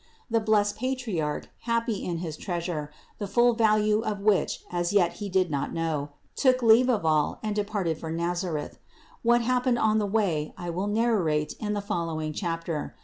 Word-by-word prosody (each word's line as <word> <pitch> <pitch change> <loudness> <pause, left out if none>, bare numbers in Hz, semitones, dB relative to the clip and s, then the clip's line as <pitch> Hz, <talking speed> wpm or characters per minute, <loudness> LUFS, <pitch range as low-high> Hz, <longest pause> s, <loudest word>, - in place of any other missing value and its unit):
The 230 - +3
blessed 210 -1 +2
Patriarch, 220 - -2
happy 230 -2 -1
in 175 -2 -2
his 155 -2 -4
Treasure, 170 -4 -3 0.3
the 205 - -3
full 240 +4 +4
value 215 -1 +3
of 215 -3 -3
which 205 -1 +1
as 175 -1 0
yet 180 -4 +3
he 205 - -3
did 185 -2 +1
not 140 -2 -2
know, 160 -3 -1 0.3
took 255 -2 +3
leave 230 +3 +6
of 215 -9 +1
all 155 -2 +2
and 215 -1 -2
departed 205 -6 -1
for 160 - -6
Nazareth: 170 -1 -2 0.4
what 240 +1 +4
happened 250 +1 +1
on 220 -1 +3
the 205 - 0
way 190 -8 0
I 175 -2 -4
will 185 +4 -2
narrate 205 -9 +1
in 210 -1 -2
the 205 - -1
following 165 -5 -3
chapter. 165 -3 -3
200 Hz, 175 wpm, -27 LUFS, 165-220 Hz, 0.4 s, leave